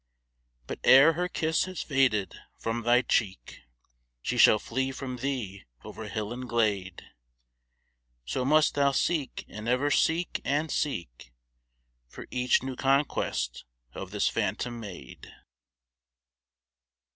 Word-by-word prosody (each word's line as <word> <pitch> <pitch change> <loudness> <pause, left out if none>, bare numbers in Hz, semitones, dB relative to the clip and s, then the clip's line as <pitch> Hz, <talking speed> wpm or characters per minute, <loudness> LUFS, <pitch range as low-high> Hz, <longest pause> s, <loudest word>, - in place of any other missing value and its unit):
But - - -6
ere 140 +5 +7
her 180 +3 -1
kiss 160 -2 0
has 185 -1 -5
faded 130 -8 +1 0.2
from 115 +1 -3
thy 120 +2 +3
cheek, 95 - -2 0.6
She - - -2
shall 110 - +7
flee 130 +5 -2
from 130 -1 -6
thee 120 -8 -4 0.2
over - - -8
hill 110 +1 -4
and 125 0 -7
glade, 100 -6 -1 1.2
So 95 - -2
must 155 +4 +3
thou 140 -1 +2
seek 150 0 -1
and 105 +2 -6
ever 135 +4 +1
seek 170 +4 +1
and 150 +3 -1
seek 85 - -3 0.8
For - - -10
each 125 0 +2
new 130 -1 -4
conquest 135 - 0 0.3
of - - -7
this - - 0
phantom 120 -1 -2
maid. 95 - -10
125 Hz, 120 wpm, -28 LUFS, 105-140 Hz, 1.2 s, ere